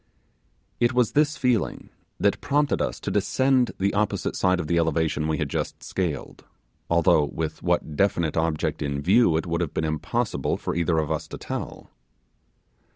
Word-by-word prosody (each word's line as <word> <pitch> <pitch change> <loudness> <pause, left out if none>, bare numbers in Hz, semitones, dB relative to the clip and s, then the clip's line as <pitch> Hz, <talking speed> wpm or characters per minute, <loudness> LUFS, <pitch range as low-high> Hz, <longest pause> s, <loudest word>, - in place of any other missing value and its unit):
It 120 +1 +2
was 125 -3 +2
this 150 0 +2
feeling 125 -5 0 0.3
that - - +1
prompted 145 +1 +1
us - - -2
to - - -3
descend 130 -2 +2
the 100 +1 0
opposite 105 0 -1
side 90 0 +2
of 90 - -2
the 85 +2 +1
elevation 80 -1 0
we 80 -1 0
had - - -1
just - - -4
scaled, 85 -8 -4 0.5
although 80 -2 +4
with 80 +2 -4
what 75 - 0
definite 85 -3 +1
object 80 -1 -1
in 70 0 -2
view 95 -2 +4
it 80 - -2
would 85 0 -1
have 85 - -3
been 80 - 0
impossible 85 +10 -1
for - - -3
either 85 0 +1
of 80 -1 0
us 80 0 -2
to - - -8
tell. - - -6
85 Hz, 170 wpm, -25 LUFS, 80-115 Hz, 0.5 s, although